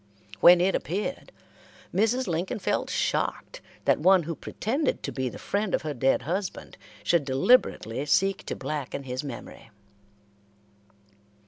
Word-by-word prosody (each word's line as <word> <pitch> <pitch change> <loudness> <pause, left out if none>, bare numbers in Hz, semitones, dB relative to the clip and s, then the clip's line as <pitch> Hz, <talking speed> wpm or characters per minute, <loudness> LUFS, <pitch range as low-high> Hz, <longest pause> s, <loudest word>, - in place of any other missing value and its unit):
When 175 - +8
it 190 +2 +2
appeared, 205 - -3 0.6
Mrs. 225 +7 +2
Lincoln 170 0 -2
felt 205 - -1
shocked - - -2 0.2
that - - +3
one 185 +2 +5
who 165 +2 -4
pretended 270 - -2
to - - -3
be 130 -1 -2
the - - -9
friend 200 -1 -1
of - - -4
her 155 -1 -3
dead 135 +1 +1
husband 185 +4 -4 0.3
should 170 -3 +2
deliberately 135 - +2
seek 195 +5 +2
to - - -3
blacken 140 -2 -4
his 130 0 -4
memory. 125 -4 -9
175 Hz, 135 wpm, -27 LUFS, 140-200 Hz, 0.6 s, When